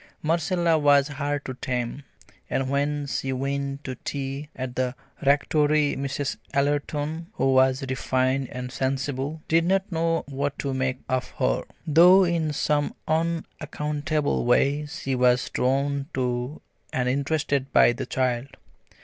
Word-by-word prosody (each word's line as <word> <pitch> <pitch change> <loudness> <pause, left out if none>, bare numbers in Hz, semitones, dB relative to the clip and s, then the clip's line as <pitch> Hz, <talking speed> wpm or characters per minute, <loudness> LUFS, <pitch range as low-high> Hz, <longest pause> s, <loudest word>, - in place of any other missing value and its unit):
Marcella 165 +1 +2
was 145 -1 +5
hard 145 0 -3
to 130 - -4
tame, 125 +1 -3 0.5
and 135 0 -1
when 145 +1 0
she 135 -1 -2
went 140 +1 -2
to 130 - -4
tea 140 +1 -4
at 130 -1 -5
the 130 0 -1 0.3
Rectory 145 +1 +3
Mrs. 140 +1 -3 0.2
Ellerton, 145 +3 -1
who 135 -8 +2
was 130 0 +4
refined 130 0 0
and 125 0 -5
sensible, 135 +3 -2
did 165 +1 +3
not 190 +3 +1
know 165 0 0
what 140 0 -2
to 140 -1 -2
make 130 0 -1
of 130 -1 -1
her, - - +1 0.2
though 175 +5 +7
in 170 -3 0
some 145 0 0
unaccountable 155 -2 -1
way 140 +5 +2
she 145 -4 -4
was 125 0 +2
drawn 140 +2 0
to 125 +2 -2 0.3
and 125 -1 0
interested 140 0 0
by - - +6
the 120 - -5
child. 130 +1 -1
140 Hz, 135 wpm, -25 LUFS, 130-150 Hz, 0.5 s, though